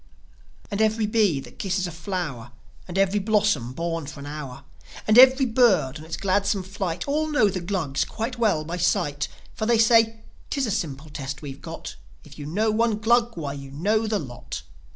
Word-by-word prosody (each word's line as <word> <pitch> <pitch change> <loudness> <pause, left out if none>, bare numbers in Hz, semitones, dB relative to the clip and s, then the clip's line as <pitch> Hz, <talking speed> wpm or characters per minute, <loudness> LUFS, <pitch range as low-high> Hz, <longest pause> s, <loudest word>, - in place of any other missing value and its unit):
And 200 +1 -1
every 220 0 +2
bee 210 -8 +2
that - - -14
kisses 190 -1 -1
a 175 - -4
flow'r, 160 - -4 0.4
And 180 +1 -5
every 195 +1 +3
blossom, 205 - +1
born 165 +1 -3
for 150 0 -8
an 140 - -8
hour, 140 -3 -7 0.4
And 215 - +4
every 260 +2 +8
bird 195 - +3
on 155 - -10
its 160 - -5
gladsome 200 0 +1
flight, 185 -1 -4
All 305 +2 +1
know 290 -9 +3
the 185 -1 -3
Glugs 170 -7 -1
quite 235 +2 -5
well 200 -10 +2
by 170 +3 -4
sight. 150 -4 0 0.3
For 215 - -3
they 235 -1 +4
say, 225 0 +4 0.3
"'Tis 275 -2 0
a 220 - -2
simple 150 -4 -3
test 135 -3 -6
we've 135 -2 -8
got: - - -8 0.3
If - - -14
you 145 - -6
know 215 +7 +1
one 225 0 +1
Glug, 235 0 +2
why, 145 -4 -3
you 140 -1 -8
know 210 +10 0
the 215 -1 +1
lot!" 130 -9 -7
190 Hz, 195 wpm, -24 LUFS, 150-220 Hz, 0.4 s, every